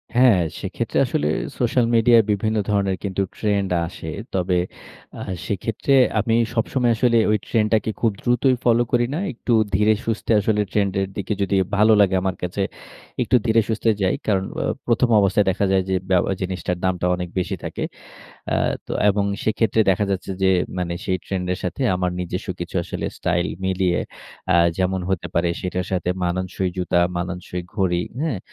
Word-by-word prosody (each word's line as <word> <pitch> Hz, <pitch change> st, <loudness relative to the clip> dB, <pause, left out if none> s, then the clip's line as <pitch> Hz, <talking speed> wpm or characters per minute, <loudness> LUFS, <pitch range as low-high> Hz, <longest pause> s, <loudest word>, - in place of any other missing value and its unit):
হ্যাঁ, 120 Hz, -6 st, +6 dB, 0.2 s
সেক্ষেত্রে -, -, -3 dB
আসলে 75 Hz, -, -1 dB, 0.3 s
সোশ্যাল 120 Hz, 0 st, +2 dB
মিডিয়ায় 115 Hz, 0 st, +6 dB
বিভিন্ন 110 Hz, +2 st, 0 dB
ধরণের 100 Hz, -2 st, +1 dB
কিন্তু 100 Hz, 0 st, -1 dB, 0.2 s
trend 100 Hz, -3 st, 0 dB, 0.2 s
আসে। 80 Hz, -2 st, -8 dB, 0.2 s
তবে 90 Hz, -1 st, +1 dB, 0.6 s
আ -, -, -6 dB, 0.3 s
সেক্ষেত্রে 110 Hz, +6 st, -1 dB, 0.3 s
আমি 115 Hz, +2 st, +1 dB, 0.2 s
সবসময় 120 Hz, +1 st, +1 dB
আসলে 120 Hz, -1 st, +3 dB
ঐ -, -, +4 dB, 0.2 s
ট্রেন্ডটাকে 110 Hz, 0 st, +2 dB
খুব 115 Hz, -2 st, +3 dB
দ্রুতই 125 Hz, +1 st, +3 dB
ফলো 120 Hz, 0 st, +4 dB
করি 120 Hz, -1 st, +3 dB
না। 160 Hz, -, -1 dB
একটু 120 Hz, +1 st, -2 dB, 0.2 s
ধীরে-সুস্থে 110 Hz, +2 st, +1 dB
আসলে 105 Hz, +1 st, +1 dB
ট্রেন্ডের 95 Hz, -2 st, 0 dB
দিকে 100 Hz, +2 st, -2 dB
যদি 100 Hz, 0 st, +1 dB, 0.2 s
ভালো 110 Hz, +2 st, +5 dB
লাগে 95 Hz, -1 st, +3 dB
আমার 95 Hz, -1 st, -1 dB
কাছে, 90 Hz, +3 st, -2 dB, 0.6 s
একটু -, -, +2 dB
ধীরে-সুস্থে 115 Hz, 0 st, +2 dB
যাই। 95 Hz, -1 st, +2 dB
কারণ, 95 Hz, -3 st, +2 dB, 0.2 s
অ -, -, -1 dB, 0.2 s
১ম 120 Hz, +1 st, +2 dB
অবস্থায় 100 Hz, +1 st, +3 dB
দেখা 95 Hz, +2 st, +1 dB
যায় 95 Hz, -1 st, +3 dB
যে, 95 Hz, -, +1 dB
বে 95 Hz, -, +4 dB, 0.3 s
জিনিসটার 90 Hz, -1 st, -2 dB
দামটা 90 Hz, -1 st, 0 dB
অনেক 90 Hz, -1 st, -5 dB
বেশি 90 Hz, -, -2 dB
থাকে। -, -, -4 dB, 0.7 s
আ -, -, +2 dB, 0.3 s
তো -, -, -6 dB, 0.2 s
এবং 100 Hz, 0 st, +2 dB, 0.2 s
সেক্ষেত্রে 110 Hz, 0 st, +2 dB
দেখা 100 Hz, +2 st, +2 dB
যাচ্ছে 95 Hz, 0 st, -2 dB
যে, 95 Hz, -, +4 dB, 0.3 s
মানে 85 Hz, -1 st, -2 dB
সেই 95 Hz, -1 st, 0 dB
ট্রেন্ডের 90 Hz, -1 st, -2 dB
সাথে 90 Hz, +9 st, -3 dB
আমার 90 Hz, 0 st, 0 dB
নিজস্ব 90 Hz, +3 st, -4 dB
কিছু 85 Hz, -, -6 dB
আসলে -, -, -4 dB
স্টাইল 85 Hz, 0 st, 0 dB, 0.2 s
মিলিয়ে 95 Hz, -2 st, +1 dB, 0.5 s
আ -, -, +3 dB, 0.2 s
যেমন 95 Hz, 0 st, 0 dB
হতে 95 Hz, -, -1 dB
পারে 85 Hz, +1 st, +2 dB
সেটার 90 Hz, 0 st, -3 dB
সাথে 90 Hz, -1 st, -1 dB, 0.2 s
মানানসই 90 Hz, +1 st, -1 dB
জুতা, 90 Hz, -1 st, +1 dB, 0.2 s
মানানসই 90 Hz, 0 st, -4 dB
ঘড়ি, 90 Hz, -4 st, +1 dB, 0.2 s
হ্যাঁ? 150 Hz, -10 st, -1 dB
95 Hz, 160 wpm, -22 LUFS, 90-110 Hz, 0.7 s, হ্যাঁ